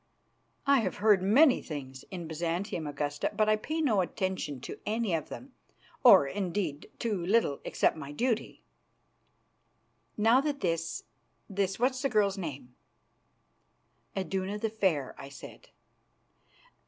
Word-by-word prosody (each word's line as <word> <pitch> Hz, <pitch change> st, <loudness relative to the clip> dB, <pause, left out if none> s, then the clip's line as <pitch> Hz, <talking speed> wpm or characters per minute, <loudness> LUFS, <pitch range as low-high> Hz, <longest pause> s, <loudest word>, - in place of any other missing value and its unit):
"I 280 Hz, -1 st, +5 dB
have 195 Hz, -6 st, -1 dB
heard 205 Hz, -2 st, +4 dB
many 250 Hz, +9 st, +5 dB
things 135 Hz, -4 st, -7 dB
in 175 Hz, -3 st, -6 dB
Byzantium, 170 Hz, +1 st, -2 dB
Augusta, 145 Hz, 0 st, -2 dB
but 215 Hz, -, +2 dB
I 215 Hz, -, +5 dB
pay 310 Hz, +9 st, -3 dB
no 220 Hz, -10 st, +3 dB
attention 185 Hz, -6 st, -3 dB
to -, -, -7 dB
any 220 Hz, -3 st, -1 dB
of 160 Hz, -2 st, -2 dB
them -, -, -9 dB, 0.5 s
or, -, -, +9 dB
indeed, 180 Hz, -1 st, -3 dB
to 210 Hz, -7 st, -2 dB
little 185 Hz, -7 st, +2 dB
except -, -, +1 dB
my 145 Hz, -3 st, -7 dB
duty." 230 Hz, -, -2 dB, 1.5 s
"Now 225 Hz, +5 st, +5 dB
that 285 Hz, -1 st, -2 dB
this, 165 Hz, -2 st, -1 dB, 0.4 s
this 195 Hz, -1 st, -1 dB
what's 255 Hz, +2 st, +1 dB
the 275 Hz, -, +1 dB
girl's 205 Hz, -4 st, +2 dB
name?" 140 Hz, -7 st, -6 dB, 1.4 s
"Iduna 190 Hz, +1 st, -2 dB
the 220 Hz, 0 st, -2 dB
Fair," 180 Hz, -11 st, 0 dB
I 135 Hz, -, -8 dB
said. 140 Hz, -, -12 dB
190 Hz, 130 wpm, -30 LUFS, 160-220 Hz, 1.5 s, or